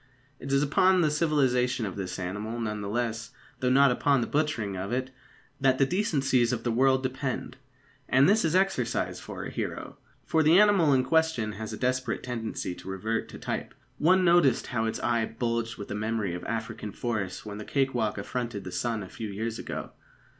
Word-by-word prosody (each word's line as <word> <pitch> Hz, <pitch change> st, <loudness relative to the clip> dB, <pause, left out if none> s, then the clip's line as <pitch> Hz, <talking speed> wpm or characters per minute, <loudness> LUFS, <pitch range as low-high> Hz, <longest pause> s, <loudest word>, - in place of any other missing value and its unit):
It 135 Hz, -, -6 dB
is 140 Hz, +1 st, +3 dB
upon 185 Hz, +6 st, +4 dB
the 155 Hz, -3 st, +2 dB
civilisation 130 Hz, -6 st, +1 dB
of 95 Hz, -, -5 dB
this 90 Hz, -2 st, -4 dB
animal, 105 Hz, +5 st, -4 dB
none 105 Hz, -2 st, -3 dB
the 100 Hz, -, -4 dB
less, 115 Hz, 0 st, -2 dB, 0.3 s
though 125 Hz, -, +1 dB
not 135 Hz, +1 st, +5 dB
upon 140 Hz, +2 st, +2 dB
the -, -, 0 dB
butchering 145 Hz, -10 st, -1 dB
of 95 Hz, +3 st, -4 dB
it, 130 Hz, +1 st, -2 dB, 0.5 s
that 135 Hz, -1 st, +3 dB
the 135 Hz, -, +4 dB
decencies 135 Hz, -, +1 dB
of 125 Hz, -, -2 dB
the 120 Hz, -, 0 dB
world 130 Hz, +2 st, +3 dB
depend. 130 Hz, 0 st, -3 dB, 0.5 s
And 130 Hz, +2 st, +5 dB
this 210 Hz, +3 st, +4 dB
is 165 Hz, +1 st, +1 dB
exercise 185 Hz, -12 st, 0 dB
for -, -, -7 dB
a -, -, -6 dB
hero, -, -, -5 dB, 0.3 s
for 160 Hz, -, +2 dB
the 160 Hz, +3 st, +6 dB
animal 200 Hz, -7 st, +5 dB
in 130 Hz, -2 st, +4 dB
question 160 Hz, -7 st, +1 dB
has 110 Hz, +1 st, -6 dB
a -, -, -5 dB
desperate 125 Hz, -1 st, -1 dB
tendency 115 Hz, -6 st, -4 dB
to 90 Hz, -, -10 dB
revert 110 Hz, +4 st, -2 dB
to -, -, -9 dB
type. -, -, -4 dB, 0.2 s
One 185 Hz, +4 st, +4 dB
noticed 170 Hz, -8 st, +4 dB
how 110 Hz, -2 st, -1 dB
its 110 Hz, -, -2 dB
eye 115 Hz, -2 st, +1 dB
bulged 115 Hz, 0 st, -2 dB
with 100 Hz, -, -8 dB
the -, -, -3 dB
memory 105 Hz, -3 st, -1 dB
of 90 Hz, 0 st, -5 dB
African 110 Hz, -2 st, -4 dB
forests 105 Hz, -5 st, -3 dB
when 105 Hz, 0 st, -6 dB
the -, -, -5 dB
cake 135 Hz, +3 st, 0 dB
walk 110 Hz, -4 st, -1 dB
affronted 115 Hz, 0 st, -4 dB
the 90 Hz, -, -7 dB
sun 110 Hz, +4 st, -2 dB
a -, -, -8 dB
few 110 Hz, +4 st, -6 dB
years 110 Hz, +3 st, -4 dB
ago. -, -, -5 dB
120 Hz, 200 wpm, -28 LUFS, 110-140 Hz, 0.5 s, the